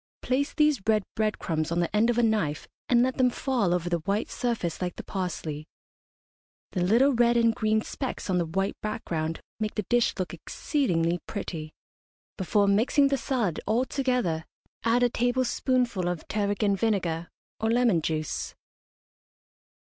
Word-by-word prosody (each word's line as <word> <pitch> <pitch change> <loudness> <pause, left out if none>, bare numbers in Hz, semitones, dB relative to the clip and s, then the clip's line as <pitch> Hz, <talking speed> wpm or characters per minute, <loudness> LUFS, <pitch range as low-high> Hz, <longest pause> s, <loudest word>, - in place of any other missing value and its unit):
Place 270 +3 0
these 300 -6 +3
red 215 -2 +4
bread 215 -1 0
crumbs 155 -2 -2
on 170 - +1
the 175 +3 -1
end 220 +3 +4
of 240 - +1
a 240 - +3
knife 205 -10 0 0.2
and 240 -1 +5
let 260 0 0
them 255 -1 +4
fall 240 -7 0
over 175 -1 0
the 170 -1 0
white 200 +6 -1
surface 225 -10 -2
like 180 -1 -2
the - - -7
parsley. 160 -5 -4 1.0
The 180 - -1
little 235 +10 +4
red 240 0 +4
and 230 -1 +4
green 220 -1 +1
specks 265 -3 -5
on 185 -2 +1
the 170 - 0
white 195 +4 -1
background 165 -6 -3 0.2
make 215 -1 -2
the 210 - -1
dish 240 +4 +2
look 185 -1 -3
exceedingly 175 - 0
pretty. 160 -7 -5 0.6
Before 200 +2 +2
mixing 235 +8 +4
the 275 - +2
salad 230 - -1
all 230 +5 +2
together 250 - 0 0.4
add 230 +2 +3
a 245 - +4
tablespoonful 245 -4 +1
of 175 -3 -3
tarragon 205 -1 +1
vinegar 180 -6 -1 0.3
or 220 - 0
lemon 230 -7 +3
juice. 155 -1 -3
210 Hz, 160 wpm, -27 LUFS, 175-240 Hz, 1.0 s, and